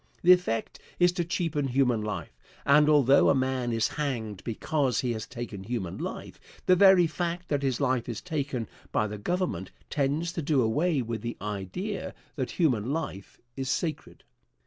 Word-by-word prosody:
The 180 Hz, -, +7 dB
effect 180 Hz, -11 st, +2 dB, 0.2 s
is 175 Hz, 0 st, +5 dB
to 175 Hz, -1 st, -1 dB
cheapen 165 Hz, -4 st, -1 dB
human 125 Hz, -3 st, +2 dB
life; 105 Hz, 0 st, -5 dB, 0.3 s
and, 150 Hz, +2 st, +6 dB
although 140 Hz, -2 st, +5 dB
a -, -, +4 dB
man 130 Hz, -2 st, 0 dB
is 115 Hz, -1 st, +2 dB
hanged 115 Hz, -9 st, -3 dB
because 130 Hz, +3 st, 0 dB
he 125 Hz, -, -1 dB
has 110 Hz, 0 st, -5 dB
taken 115 Hz, -6 st, -6 dB
human 100 Hz, -5 st, -4 dB
life, -, -, -6 dB, 0.3 s
the 185 Hz, -, +6 dB
very 190 Hz, -1 st, +7 dB
fact 175 Hz, +2 st, -3 dB
that 145 Hz, -2 st, +1 dB
his 135 Hz, -3 st, 0 dB
life 130 Hz, -4 st, 0 dB
is 115 Hz, -, -3 dB
taken 140 Hz, -8 st, -3 dB, 0.2 s
by 110 Hz, -, +2 dB
the 105 Hz, 0 st, -5 dB
Government 175 Hz, -, -2 dB, 0.2 s
tends 150 Hz, +4 st, 0 dB
to 170 Hz, -, -2 dB
do 140 Hz, -3 st, +2 dB
away 145 Hz, +5 st, +1 dB
with 115 Hz, -2 st, -4 dB
the 120 Hz, +1 st, -4 dB
idea 105 Hz, -, -4 dB, 0.2 s
that 130 Hz, -4 st, -2 dB
human 130 Hz, -, +1 dB
life 145 Hz, -, -5 dB, 0.2 s
is 135 Hz, -1 st, -3 dB
sacred. 155 Hz, +2 st, -3 dB
135 Hz, 170 wpm, -28 LUFS, 115-165 Hz, 0.3 s, The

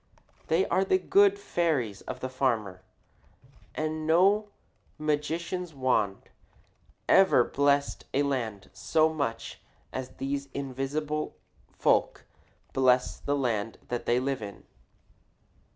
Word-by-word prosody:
They 165 Hz, +4 st, +2 dB
are 185 Hz, +2 st, +2 dB
the 375 Hz, -, +3 dB
good 400 Hz, +1 st, +4 dB
fairies 155 Hz, -, -1 dB
of 130 Hz, 0 st, -6 dB
the 130 Hz, -, -2 dB
farmer, 115 Hz, -8 st, -1 dB, 0.9 s
and 155 Hz, 0 st, -2 dB
no 195 Hz, +6 st, +4 dB, 0.5 s
magician's 160 Hz, +3 st, -2 dB
wand 125 Hz, -7 st, 0 dB, 0.8 s
ever 190 Hz, -10 st, +6 dB
blessed 140 Hz, +2 st, +1 dB
a 140 Hz, -, +2 dB
land 115 Hz, -8 st, -3 dB
so 160 Hz, 0 st, +2 dB
much 115 Hz, -7 st, -4 dB, 0.3 s
as 130 Hz, -1 st, -4 dB
these 140 Hz, +1 st, -3 dB
invisible 140 Hz, +3 st, -3 dB, 0.3 s
folk -, -, +1 dB, 0.5 s
bless 125 Hz, -1 st, +2 dB
the 145 Hz, -, -1 dB
land 115 Hz, -5 st, -1 dB
that 120 Hz, -1 st, -3 dB
they 120 Hz, +1 st, +3 dB
live 135 Hz, -1 st, -2 dB
in. 100 Hz, -2 st, -8 dB
140 Hz, 110 wpm, -28 LUFS, 125-160 Hz, 0.9 s, ever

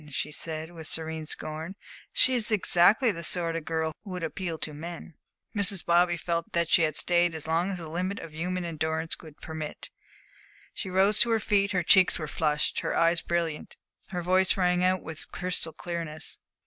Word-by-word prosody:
she 150 Hz, +2 st, -3 dB
said, 160 Hz, +2 st, -6 dB
with 160 Hz, -3 st, -9 dB
serene 160 Hz, -1 st, -5 dB
scorn. 160 Hz, +5 st, -5 dB, 0.4 s
"She 260 Hz, -, +5 dB
is 235 Hz, -4 st, 0 dB
exactly 215 Hz, +3 st, +4 dB
the 170 Hz, -4 st, -6 dB
sort 170 Hz, 0 st, 0 dB
of 165 Hz, -2 st, -4 dB
girl 160 Hz, -1 st, -1 dB
who 205 Hz, -, -11 dB
would 180 Hz, -2 st, -5 dB
appeal 165 Hz, 0 st, -4 dB
to 155 Hz, -, -4 dB
men." 170 Hz, +2 st, -8 dB, 0.4 s
Mrs. 200 Hz, -2 st, +4 dB
Bobby 175 Hz, 0 st, +3 dB
felt 170 Hz, 0 st, -3 dB
that 170 Hz, -1 st, +1 dB
she -, -, +6 dB
had 155 Hz, -2 st, +1 dB
stayed 175 Hz, 0 st, +3 dB
as 160 Hz, -1 st, -1 dB
long 165 Hz, +4 st, +1 dB
as 195 Hz, -, -3 dB
the 165 Hz, -2 st, -7 dB
limit 180 Hz, +5 st, -3 dB
of 160 Hz, -, -9 dB
human 180 Hz, +3 st, -3 dB
endurance 160 Hz, 0 st, 0 dB
would 155 Hz, -2 st, -14 dB
permit. 160 Hz, -2 st, -7 dB, 0.8 s
She 190 Hz, -, -5 dB
rose 195 Hz, +3 st, +3 dB
to 235 Hz, -, +4 dB
her 225 Hz, -1 st, +2 dB
feet, 200 Hz, -1 st, +1 dB
her 180 Hz, -2 st, +1 dB
cheeks 185 Hz, +2 st, +5 dB
were 155 Hz, -, -5 dB
flushed, 150 Hz, 0 st, 0 dB
her -, -, -2 dB
eyes 165 Hz, 0 st, +3 dB
brilliant, 170 Hz, -3 st, -3 dB, 0.3 s
her 180 Hz, -2 st, -4 dB
voice 185 Hz, +2 st, +2 dB
rang 180 Hz, -1 st, +2 dB
out 185 Hz, 0 st, +2 dB
with 160 Hz, -1 st, -6 dB
crystal 180 Hz, -3 st, 0 dB
clearness. 165 Hz, -2 st, -5 dB
170 Hz, 190 wpm, -27 LUFS, 160-185 Hz, 0.8 s, she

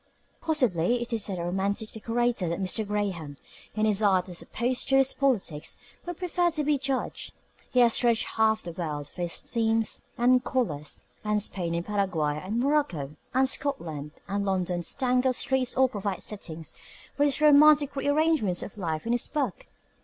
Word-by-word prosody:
Possibly, 245 Hz, -, +2 dB
it 240 Hz, -, -6 dB
is 220 Hz, -2 st, 0 dB
as 190 Hz, -, -3 dB
a 170 Hz, -, -3 dB
romantic 195 Hz, +4 st, -2 dB
decorator 230 Hz, -4 st, -1 dB
that 170 Hz, -, -2 dB
Mr. 200 Hz, +3 st, 0 dB
Graham, 190 Hz, -9 st, -3 dB, 0.4 s
in 215 Hz, 0 st, +1 dB
his 210 Hz, -1 st, +2 dB
art 190 Hz, -3 st, +3 dB
as 175 Hz, -, -2 dB
opposed 245 Hz, +1 st, -1 dB
to 270 Hz, -, +5 dB
his 270 Hz, 0 st, +3 dB
politics, 215 Hz, -, 0 dB, 0.3 s
would 350 Hz, -2 st, -4 dB
prefer 355 Hz, -1 st, +1 dB
to 310 Hz, -2 st, -2 dB
be 295 Hz, -1 st, +1 dB
judged. 270 Hz, -1 st, -3 dB, 0.4 s
He 250 Hz, -, +3 dB
has 235 Hz, -2 st, +5 dB
dredged 235 Hz, -2 st, +3 dB
half 220 Hz, 0 st, +2 dB
the 175 Hz, -, -5 dB
world 150 Hz, -4 st, -4 dB
for 180 Hz, -, -9 dB
his 175 Hz, -1 st, -1 dB
themes 225 Hz, -1 st, 0 dB, 0.2 s
and 250 Hz, +1 st, +4 dB
colours, 150 Hz, -, -2 dB, 0.2 s
and 210 Hz, 0 st, +1 dB
Spain 175 Hz, -4 st, -2 dB
and 170 Hz, +1 st, -2 dB
Paraguay 175 Hz, -8 st, -1 dB
and 210 Hz, +5 st, -2 dB
Morocco 245 Hz, -, 0 dB, 0.2 s
and 265 Hz, +1 st, +4 dB
Scotland 165 Hz, -, -2 dB
and 200 Hz, +1 st, -1 dB
London's 180 Hz, -3 st, -1 dB
tangled 255 Hz, -1 st, +2 dB
streets 260 Hz, -1 st, +1 dB
all 260 Hz, 0 st, +5 dB
provide 200 Hz, -5 st, -3 dB
settings 165 Hz, -6 st, -5 dB, 0.4 s
for 285 Hz, -, +2 dB
his 285 Hz, -1 st, +2 dB
romantic 300 Hz, -1 st, +6 dB
rearrangements 285 Hz, -, +1 dB
of 205 Hz, -, -9 dB
life 160 Hz, -2 st, -3 dB
in 230 Hz, -, -1 dB
this 240 Hz, 0 st, +1 dB
book. 305 Hz, -, -3 dB
220 Hz, 175 wpm, -27 LUFS, 180-265 Hz, 0.4 s, romantic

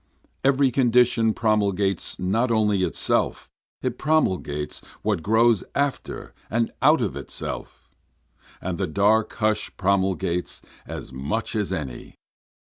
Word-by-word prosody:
Every 135 Hz, 0 st, +4 dB
condition 120 Hz, -2 st, +3 dB
promulges 100 Hz, -4 st, +1 dB
not 110 Hz, +7 st, +1 dB
only 105 Hz, -4 st, +2 dB
itself, 90 Hz, -, 0 dB, 0.3 s
it 125 Hz, -1 st, -2 dB
promulges 90 Hz, -, 0 dB, 0.2 s
what -, -, 0 dB
grows 110 Hz, +2 st, +3 dB
after 140 Hz, -1 st, -2 dB, 0.2 s
and 115 Hz, 0 st, 0 dB
out -, -, +5 dB
of -, -, -2 dB
itself, -, -, -6 dB, 0.7 s
And 90 Hz, 0 st, -4 dB
the 95 Hz, -, 0 dB
dark 105 Hz, +6 st, +2 dB
hush 110 Hz, -1 st, 0 dB
promulges 95 Hz, -3 st, 0 dB, 0.2 s
as -, -, -7 dB
much 75 Hz, -, -3 dB
as 105 Hz, -3 st, -1 dB
any. 70 Hz, -9 st, -5 dB
105 Hz, 115 wpm, -24 LUFS, 95-115 Hz, 0.7 s, out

